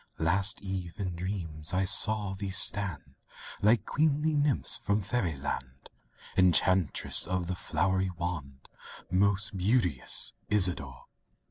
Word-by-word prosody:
Last 95 +6 +1
eve 95 -3 -6
in 90 -3 -4
dreams, 85 -3 -4
I 95 +1 +1
saw 105 0 +4
thee 100 0 -6
stand, 95 -4 +1 0.5
Like 110 +3 +2
queenly 155 +1 0
nymphs 145 -3 0
from 100 0 -2
Fairy 100 -6 -2
land— 65 -1 -7 0.4
Enchantress 90 -2 +3
of 90 0 -2
the 90 - -3
flowery 95 +3 -1
wand, 75 -7 -6 0.4
Most 100 +2 0
beauteous 95 - +1 0.2
Isadore! 85 -11 +1
95 Hz, 115 wpm, -28 LUFS, 85-100 Hz, 0.5 s, saw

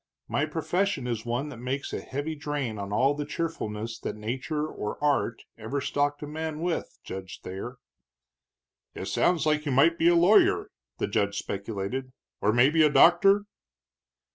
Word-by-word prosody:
My 150 +2 0
profession 165 -1 -1
is 120 -1 -3
one 125 +5 -1
that 140 - -9
makes 130 +3 -3
a - - -3
heavy 145 +4 -4
drain 145 -7 -3
on 100 0 -5
all 130 +7 +3
the 145 0 -3
cheerfulness 115 -10 -4
that 105 - -4
nature 130 +8 -3
or 105 -8 -5
art 140 -5 0 0.2
ever 115 +6 -3
stocked 145 +2 -1
a - - -5
man 155 0 -4
with, 175 -1 -2
Judge 95 -1 -7
Thayer." 95 +7 -6 1.2
"It - - -5
sounds 175 -3 +2
like 150 0 +1
you - - +1
might 160 +6 +4
be 165 - +4
a 175 - +6
lawyer," 180 +5 +4 0.3
the - - 0
judge 100 0 0
speculated, 105 +7 -4 0.3
"or 105 - +3
maybe 135 +8 +4
a 155 - +6
doctor?" 195 +7 +6
140 Hz, 165 wpm, -27 LUFS, 115-155 Hz, 1.2 s, a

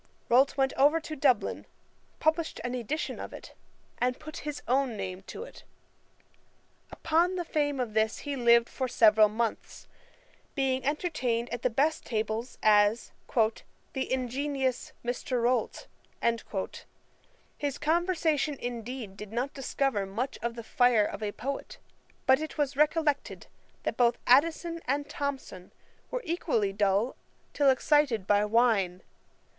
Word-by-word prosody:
Rolt 265 +4 +4
went 270 -1 +2
over 290 +4 +5
to 315 -1 -7
Dublin, 265 -4 +1 0.5
published 320 +1 0
an 245 0 -3
edition 255 +6 -3
of - - -7
it, - - -11 0.5
and 250 0 +1
put 310 0 -9
his 295 -1 -6
own 255 -3 +1
name 185 -1 -5
to - - -7
it. - - -13 1.3
Upon 345 +3 +1
the 350 -2 -2
fame 290 -4 0
of 240 -4 -2
this 220 0 +1
he 285 -1 -2
lived 235 -2 +5
for 260 - -3
several 215 -3 +5
months, 225 +1 -3 0.7
being 265 -2 0
entertained 260 -6 -1
at 240 - -3
the 255 - +2
best 295 +7 +1
tables 220 +2 -3
as 210 +1 +4 0.2
'the 230 +3 -2
ingenious 260 +1 -1
Mr. 245 +1 -2
Rolt.' 245 -1 0 1.7
His 285 -1 -3
conversation 315 -3 +1
indeed, 240 -3 -5
did 210 0 -9
not 245 +5 -2
discover 270 -6 -1
much 235 +8 -3
of 235 +1 -2
the 230 - -7
fire 240 -2 +3
of - - -5
a 210 -1 -2
poet; 270 +6 -5 0.5
but 265 +1 +5
it 315 - -6
was 285 -2 0
recollected, 300 0 +1 0.4
that - - -2
both 240 -1 +3
Addison 330 +5 +3
and 285 +2 0
Thomson 280 -11 -5 0.4
were - - -3
equally 290 - 0
dull 205 +4 +1 0.4
till 285 -2 +4
excited 265 -5 +2
by 205 +1 +3
wine. 210 -5 +2
255 Hz, 135 wpm, -29 LUFS, 225-290 Hz, 1.7 s, over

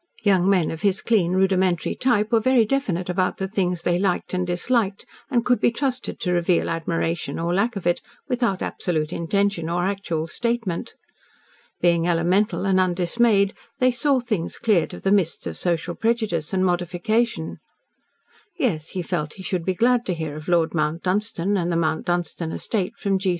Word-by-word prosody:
Young 195 -2 +3
men 185 -5 +2
of 160 - -6
his 200 -2 +2
clean, 190 -7 +2
rudimentary 185 -2 +2
type 225 -4 +1
were 230 - +5
very 245 0 +4
definite 205 -9 -1
about 185 0 0
the 190 - -2
things 180 -4 -1
they 175 0 +1
liked 190 -1 -1
and 180 -1 0
disliked, 200 +3 0 0.2
and 240 -4 +1
could 245 0 +3
be - - +4
trusted 255 +1 -3
to 180 - 0
reveal 175 0 +1
admiration, 165 +1 -2
or 170 +1 -1
lack 215 +5 +1
of 195 - -5
it, 175 0 +1 0.3
without 240 -7 0
absolute 155 -3 -2
intention 190 -1 0
or 175 +1 0
actual 190 -5 -2
statement. 230 0 -2 0.9
Being 170 -1 +3
elemental 180 +5 +1
and 190 -1 +3
undismayed, 195 +3 +2 0.2
they 255 0 +3
saw 265 +2 +2
things 215 -9 -3
cleared 205 -8 +1
of - - -12
the 195 - +2
mists 190 -5 +1
of - - -4
social 175 -1 -1
prejudice 220 -8 -1
and 190 -1 +1
modification. 180 +3 -1 1.0
Yes, 170 - -1
he 180 - -1
felt 155 -4 -3
he 190 - -10
should 180 -1 -2
be 185 - 0
glad 240 +4 +3
to 180 - 0
hear 160 -3 -4
of 155 0 -9
Lord 170 -2 +2
Mount 155 +1 -1
Dunstan 200 0 0
and 175 -1 -1
the - - 0
Mount 160 0 0
Dunstan 175 -1 -2
estate 210 +3 -2
from 195 -2 0
G. 190 0 0
185 Hz, 180 wpm, -23 LUFS, 170-215 Hz, 1.0 s, were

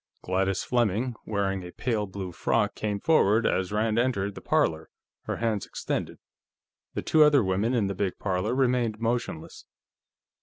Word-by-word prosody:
Gladys 95 +1 0
Fleming, 120 0 0
wearing 100 -2 -1
a 90 - -8
pale 110 -2 -2
blue 95 -1 -6
frock, - - 0
came 105 -2 -3
forward 115 -6 +3
as 95 0 0
Rand 110 +1 +1
entered 100 -5 0
the - - -9
parlor, - - +1 0.4
her - - -2
hand 110 -4 -1
extended. - - -3 0.8
The - - -2
two 155 - +3
other 145 -4 +5
women 100 +6 0
in 115 -4 +2
the 100 - -2
big 95 -1 -2
parlor 95 +4 -1
remained 125 -4 +1
motionless. 115 -8 -3
105 Hz, 155 wpm, -27 LUFS, 95-120 Hz, 0.8 s, other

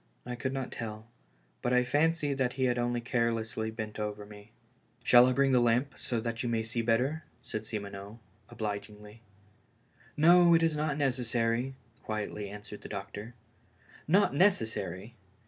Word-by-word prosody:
I 125 - -4
could 130 +2 -3
not 135 -1 -4
tell; 110 -2 -6 0.6
but 120 - 0
I 125 0 +4
fancied 145 +1 +1
that 125 -1 +1
he 130 - -2
had 125 -1 +2
only 120 0 0
carelessly 115 -2 -1
bent 110 -1 -6
over 105 -1 -4
me. 105 +1 -14 0.5
"Shall 120 +1 +7
I - - +3
bring 135 +1 +3
the 125 - +5
lamp, 120 +4 +2
so 120 - -2
that 115 0 -3
you 120 - -2
may 115 -1 0
see 115 +1 -2
better?" 125 +8 +1 0.2
said 110 -2 -5
Simoneau, 100 0 -6 0.3
obligingly. 105 0 -6 1.0
"No, 170 +2 +7
it 165 - +3
is 165 -2 +2
not 150 -1 -1
necessary," 125 -2 0 0.3
quietly 105 -1 -4
answered 105 0 -9
the - - -9
doctor. 105 +3 -7 0.7
Not 190 +3 +4
necessary! 115 - +1
120 Hz, 155 wpm, -30 LUFS, 110-135 Hz, 1.0 s, Shall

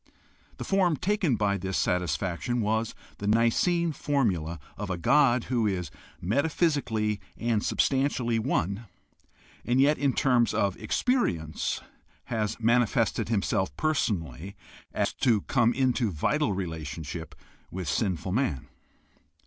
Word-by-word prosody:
The - - -5
form 185 -5 +2
taken 185 - +1
by 100 -2 0
this 95 +1 -2
satisfaction 90 - -1
was 110 +1 0 0.2
the 100 - -3
Nicene 140 - +2
formula 100 - 0 0.2
of 105 -1 -5
a 90 - -1
God 125 - +4
who 120 -4 0
is 90 -6 -2 0.3
meta 135 - +1
physically 110 - 0 0.2
and 115 -3 0
substantially 130 -4 +1
one 110 - -1 0.8
and 125 +2 +1
yet 145 +3 +4
in 140 -2 +2
terms 125 -4 +2
of 100 -2 +1
experi 250 - +1
ence 80 0 -3 0.4
has 110 -2 -2
manifested 115 0 +2
himself 100 -3 0
personally 100 - -1
so 95 - -21
as - - +1
to 115 -5 +2
come 115 +4 +2
into 125 -3 +1
vital 115 - 0
relationship 80 -3 -5 0.3
with 90 -2 -5
sinful 95 +3 -1
man. 110 - -1
110 Hz, 125 wpm, -27 LUFS, 95-135 Hz, 0.8 s, God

